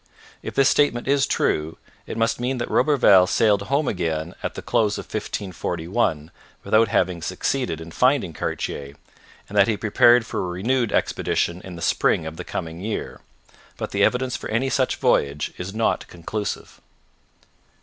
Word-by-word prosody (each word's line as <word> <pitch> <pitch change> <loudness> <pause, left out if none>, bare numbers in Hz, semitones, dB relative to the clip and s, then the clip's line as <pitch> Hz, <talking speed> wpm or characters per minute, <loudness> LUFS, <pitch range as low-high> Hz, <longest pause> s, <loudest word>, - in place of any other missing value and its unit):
If - - -7
this 135 -1 +4
statement 140 -6 +2
is 140 0 +3
true, 75 +1 0 0.3
it - - -5
must 115 0 +1
mean 125 +2 -1
that 120 - -4
Roberval 100 -11 +5
sailed 100 0 +3
home 140 +7 0
again 85 -2 -2
at - - -4
the - - -7
close 105 -2 +1
of - - -6
1541, 90 -4 -2 0.3
without 110 +1 +4
having 90 -4 0
succeeded 125 - -2
in 80 0 -9
finding 125 - +2
Cartier, 70 -1 -4 0.5
and 100 - -10
that 100 -1 +5
he 110 -2 0
prepared 120 +3 +4
for - - -4
a 90 - -2
renewed 115 +6 0
expedition 85 +1 0
in 90 -2 -8
the 85 - -7
spring 80 - +2
of 80 0 -7
the - - -5
coming 80 +1 -5
year. 110 +2 -4 0.6
But - - -5
the - - +1
evidence 125 0 +1
for - - -6
any 130 +4 0
such 130 -2 +1
voyage 70 +1 +1
is 90 +2 -5
not 110 +2 0
conclusive. 100 +5 -5
105 Hz, 165 wpm, -23 LUFS, 85-120 Hz, 0.6 s, Roberval